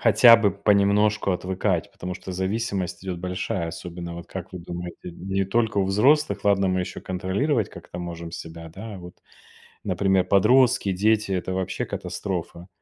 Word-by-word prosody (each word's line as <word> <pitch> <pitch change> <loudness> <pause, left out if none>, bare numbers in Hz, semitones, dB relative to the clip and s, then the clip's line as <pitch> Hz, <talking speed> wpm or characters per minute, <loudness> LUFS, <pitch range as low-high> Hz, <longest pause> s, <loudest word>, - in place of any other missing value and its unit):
Хотя 115 +1 +8
бы 105 -4 +2
понемножку 100 0 +3
отвыкать. 90 -1 -1
Потому 90 0 -6
что 95 - -8
зависимость 95 -2 -2
идёт 90 -2 -4
большая, 90 -1 -3
особенно, 85 0 -7
вот, 85 - -9
как 95 -1 -7
вы 90 - -6
думаете, 85 0 -7
не 95 +3 -2
только 110 +1 0
у 95 - +3
взрослых, 130 +10 +3
ладно, 100 -1 +3
мы 95 0 +1
ещё 90 - -5
контролировать 95 - -1
как-то 90 - -10
можем 85 -1 -6
себя, 80 0 -8
да 105 +3 -8
а, - - -8
вот, 90 0 -11 0.7
например, 95 0 +2
подростки, 115 +1 +4
дети 105 +1 +2
это- 95 0 -2
вообще 95 0 -2
катастрофа. 90 -2 -5
95 Hz, 160 wpm, -24 LUFS, 90-105 Hz, 0.7 s, Хотя